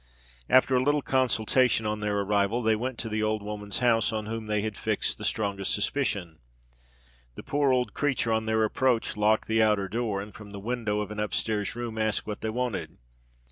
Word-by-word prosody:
After 130 0 +5
a 125 - +4
little 145 +1 +2
consultation 125 -2 +2
on 105 0 -1
their 105 -1 0
arrival, 100 +4 +1
they 110 0 +3
went 125 +3 -3
to 115 - -4
the 110 0 -1
old 110 -1 0
woman's 105 -1 -3
house 115 -2 +3
on 110 -1 -3
whom 110 0 -5
they 105 -1 0
had 110 -1 -3
fixed - - -1
the - - -7
strongest 100 -3 0
suspicion. 100 - -1 1.0
The - - -8
poor 145 -1 +1
old 125 -4 +1
creature 130 -6 0
on 110 0 0
their 110 0 +2
approach 120 +2 +1
locked 105 +1 +2
the 110 0 +2
outer 105 -3 +3
door, 110 -1 -2
and 105 +1 -7
from 105 -1 -11
the 100 - -6
window 110 -1 -1
of 105 0 -5
an 105 - -5
upstairs 105 0 -1
room 120 -2 -4
asked 110 -1 0
what 105 -1 -5
they 110 - -2
wanted. 120 -1 -3
110 Hz, 200 wpm, -27 LUFS, 105-120 Hz, 1.0 s, After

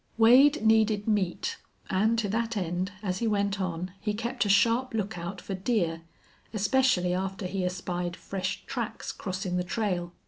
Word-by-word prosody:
Wade 255 +4 +6
needed 220 -1 +3
meat, 200 -5 0 0.3
and 215 +5 +2
to 225 -2 0
that 230 +1 -1
end, 180 +1 -2
as 185 -2 -1
he 230 - 0
went 200 -1 0
on, 180 0 -3
he 210 -1 -1
kept 235 +2 -1
a - - -1
sharp 230 +5 +3
lookout 195 -3 -3
for 195 - -6
deer, 185 -5 0 0.5
especially 205 -4 +2
after 190 +1 -3
he 185 +1 -2
espied 180 -1 -3
fresh 185 0 -4
tracks - - -4
crossing 185 -2 -3
the 180 - 0
trail. 180 -3 -2
200 Hz, 160 wpm, -28 LUFS, 180-225 Hz, 0.5 s, Wade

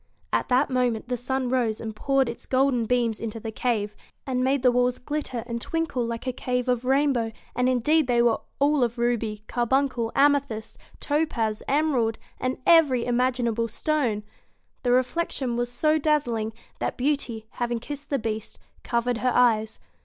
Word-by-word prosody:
At - - +1
that 255 +1 +3
moment 245 -2 0
the 250 - 0
sun 255 +1 -2
rose 235 -4 +1
and 220 -1 -6
poured 270 +3 +1
its 235 - -7
golden 260 -3 +2
beams 235 -2 +1
into 225 0 -5
the 225 0 -5
cave, 215 -3 -1 0.3
and 255 -1 0
made 265 0 +1
the 250 - +6
walls 250 0 +2
glitter 260 -4 -4
and 235 -1 -4
twinkle 325 -6 -1
like 230 +1 -4
a 255 - -1
cave 250 0 -2
of 250 -1 0
rainbow, 265 -4 +2 0.2
and 250 +1 +2
indeed 285 +4 +2
they 240 -1 +2
were 235 -1 +3 0.2
all 285 -1 +3
of 240 0 -1
ruby, 230 -3 -1
carbuncle, 245 -1 0
amethyst, 280 -6 +1 0.2
topaz, 250 -8 0
emerald, 270 -6 +1 0.2
and 255 +1 -1
every 300 -8 +5
imaginable 240 -2 +1
stone. 235 -3 -1 0.6
The 245 - +1
reflection 255 0 0
was 240 0 -1
so 310 +5 +2
dazzling 240 -8 0 0.3
that - - -2
Beauty 250 -5 -1 0.2
having 240 0 0
kissed 285 +4 -7
the 280 - +1
Beast 220 -3 -4 0.3
covered 235 0 0
her 255 - +1
eyes. 220 -3 +3
245 Hz, 165 wpm, -25 LUFS, 230-270 Hz, 0.6 s, the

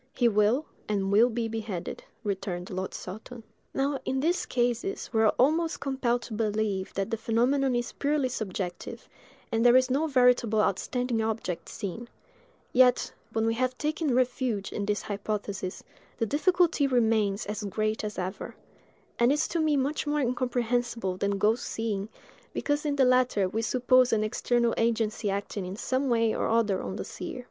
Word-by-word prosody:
"He 240 - +3
will, 220 +7 +3 0.2
and 195 -2 0
will 225 +5 +6
be 230 -1 -2
beheaded," 220 -5 -5 0.2
returned 190 -3 -3
Lord 185 0 -4
Saltoun. 220 +5 -8 0.3
Now, 275 0 0
in 265 0 -1
these 340 +6 0
cases 245 - -1
we 220 - +3
are 220 - +5
almost 320 +5 +2
compelled 245 -3 0
to 225 - -8
believe 210 -3 -1
that 195 0 -2
the 225 - 0
phenomenon 250 +4 +1
is 240 0 -1
purely 285 -2 0
subjective, 190 -6 -5 0.4
and 225 0 +1
there 245 0 +6
is 255 0 +4
no 295 +5 +2
veritable 250 -5 +3
outstanding 230 +4 0
object 220 -6 -3
seen; 225 +5 -6 0.6
yet, 250 -1 +4 0.2
when 225 0 0
we 225 - +2
have 255 +2 -1
taken 305 -3 0
refuge 245 -5 0
in 200 -1 -3
this 205 -1 0
hypothesis, 200 -2 -4 0.3
the 225 - +1
difficulty 335 - +2
remains 220 -5 +2
as 210 0 -4
great 215 +2 -1
as 210 0 -4
ever; 185 +2 -5 0.6
and 240 +2 +5
is 295 - +1
to 335 - -1
me 310 -2 +2
much 285 +3 -1
more 295 0 +1
incomprehensible 240 -4 -1
than 200 +1 -1
ghost 215 +4 +2
seeing, 215 -2 -3 0.5
because 290 +1 0
in 290 - 0
the 270 -2 +4
latter 250 -6 +3
we 220 +4 -2
suppose 255 +1 +3
an 215 -1 +2
external 235 +2 +1
agency 225 -2 0
acting 200 0 -3
in 185 +1 -5
some 260 +5 -1
way 230 -2 +2
or - - -1
other 220 -4 +2
on 190 - -5
the - - -5
seer. - - -6
230 Hz, 170 wpm, -28 LUFS, 210-255 Hz, 0.6 s, will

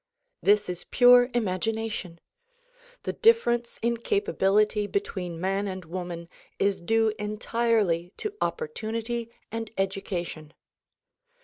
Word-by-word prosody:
This 205 +1 +4
is 180 -1 -6
pure 245 0 +7
imagination. 215 -4 -2 0.8
The - - -2
difference 240 - +3
in 235 0 +1
capability 210 - +2
between 185 - -3
man 195 +3 0
and 185 -2 -5
woman 170 0 -5 0.3
is 200 -2 +1
due 225 +3 +2
entirely 210 -4 0
to 425 -1 -3
opportunity 235 - -2 0.2
and 225 -1 -4
education. 180 -5 -3
210 Hz, 100 wpm, -27 LUFS, 185-235 Hz, 0.8 s, pure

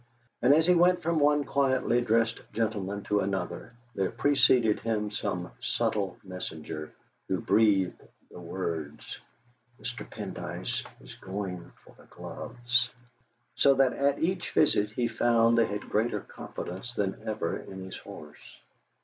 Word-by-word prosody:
And 125 - +5
as 160 +1 +4
he 180 - +6
went 180 +1 +4
from 165 0 +1
one 145 0 +4
quietly 130 -3 +2
dressed 115 0 +2
gentleman 105 -3 -1
to 105 - +1
another 95 +4 -3 0.2
there 95 -3 0
preceded 125 -3 +4
him 105 -2 -1
some 90 -4 -3
subtle 95 -4 -1
messenger, 80 -5 -6 0.4
who - - 0
breathed 100 -4 +3 0.3
the - - -10
words, 85 -4 -5 0.6
'Mr. - - -6
Pendyce - - -4 0.2
is - - -11
going 95 -2 -5
for - - -16
the - - -16
gloves,' 120 0 -1 0.6
so 140 -1 +5
that 135 -1 +4
at 140 0 +2
each 180 +2 -1
visit 105 -9 +3
he 120 +2 -1
found 115 0 +3
they 115 -1 +4
had 105 0 -3
greater 110 +3 0
confidence 95 +8 -7
than 95 -1 -1
ever 105 -6 -1
in 95 -1 -8
his 95 - -7
horse. 75 -1 -12
110 Hz, 140 wpm, -29 LUFS, 95-125 Hz, 0.6 s, he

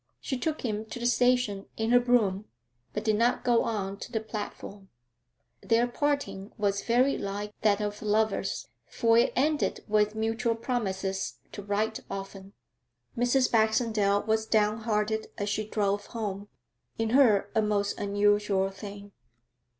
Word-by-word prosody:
She 265 - -3
took 310 +5 -2
him 215 -1 -2
to 220 - -7
the 240 - -4
station 245 -5 +2
in 225 +1 0
her 245 - +7
brougham, 220 -5 +2 0.5
but 210 - -4
did 215 -2 +2
not 235 +2 +2
go 240 -2 +3
on 200 -3 -2
to 240 - -9
the 225 - 0
platform. 205 -2 -7 0.7
Their 230 +1 +3
parting 245 -7 -2
was 200 -1 0
very 250 +4 +2
like 205 +1 -4
that 210 -1 +3
of 205 0 -3
lovers, 215 0 0 0.2
for 230 -1 +2
it - - +3
ended 295 +2 0
with 210 0 +2
mutual 225 +1 0
promises 195 -5 -2 0.2
to 205 - -7
'write 205 +2 -1
often.' 195 0 -7 0.6
Mrs. 245 +2 +2
Baxendale 220 -2 +2
was 220 0 0
down 215 0 +2
hearted 220 -1 -1
as 205 0 -2
she 210 +1 -2
drove 205 -1 -1
home 205 -3 -4 0.5
in 225 -1 -1
her 220 -7 +4
a 220 - +3
most 205 -1 0
unusual 205 -1 +2
thing. 200 0 -9
215 Hz, 150 wpm, -28 LUFS, 205-230 Hz, 0.7 s, her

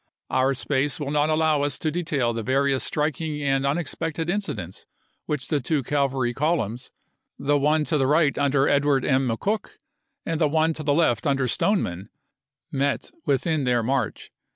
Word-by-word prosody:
Our 135 +1 +2
space 135 +1 0
will 145 -2 -3
not 150 0 +2
ism. - - +2
allow 155 -2 +2
us 145 -2 -1
to 155 - -1
detail 145 -8 0
the 115 - -3
various 135 +3 +1
striking 150 0 -1
and 135 -1 +1
unex 145 +1 -1
pected 165 +1 -2
incidents 110 - -4 0.4
which 145 -4 -2
the 150 - +1
two 145 +2 0
cavalry 135 -3 0
columns, 130 -5 -1 0.5
the 145 +1 +1
one 150 +2 +2
to 150 -1 0
the 135 - +2
right 150 0 +3
under 140 -1 +2
Edward 145 -1 +2
M. 130 -1 +2
McCook 200 - -2 0.5
and 165 -1 -2
the 155 - +5
one 160 +1 +2
to 155 - -6
the 145 -1 +1
left 135 -8 +2
under 135 -2 +1
Stoneman, 105 - 0 0.6
met 140 +1 -1 0.2
with 135 -2 +1
in 160 -4 0
their 120 -2 +1
march. 125 -1 -2
140 Hz, 175 wpm, -24 LUFS, 130-155 Hz, 0.6 s, the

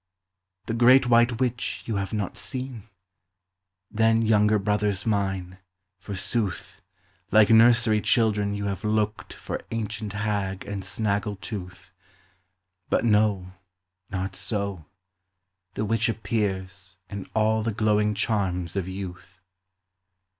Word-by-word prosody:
The 115 - -3
great 125 +3 +6
white 120 0 +4
witch 125 -2 -1
you 110 -3 -2
have 100 -1 -3
not 105 -3 -3
seen? 125 -5 -6 1.0
Then, 115 +1 +3
younger 105 -1 +4
brothers 105 -1 0
mine, 95 -4 -1 0.4
forsooth, 100 0 -3 0.5
Like 110 0 +6
nursery 115 -1 +5
children 105 -3 +2
you 100 0 -3
have 100 +1 -3
looked 105 0 -1
For - - -6
ancient 110 -2 -4
hag 100 -2 -2
and 100 -1 -5
snaggle 100 +1 -1
tooth; 90 -3 -8 1.0
But - - +1
no, 105 -4 +2 0.6
not 95 0 -3
so; 100 -6 -2 0.9
the 110 - -1
witch 115 +2 +1
appears 95 -4 -3
In 100 -1 -7
all 110 0 +2
the 115 +1 -1
glowing 105 0 +1
charms 95 -5 -1
of 95 -2 -2
youth. 95 -1 -8
105 Hz, 115 wpm, -25 LUFS, 95-110 Hz, 1.0 s, great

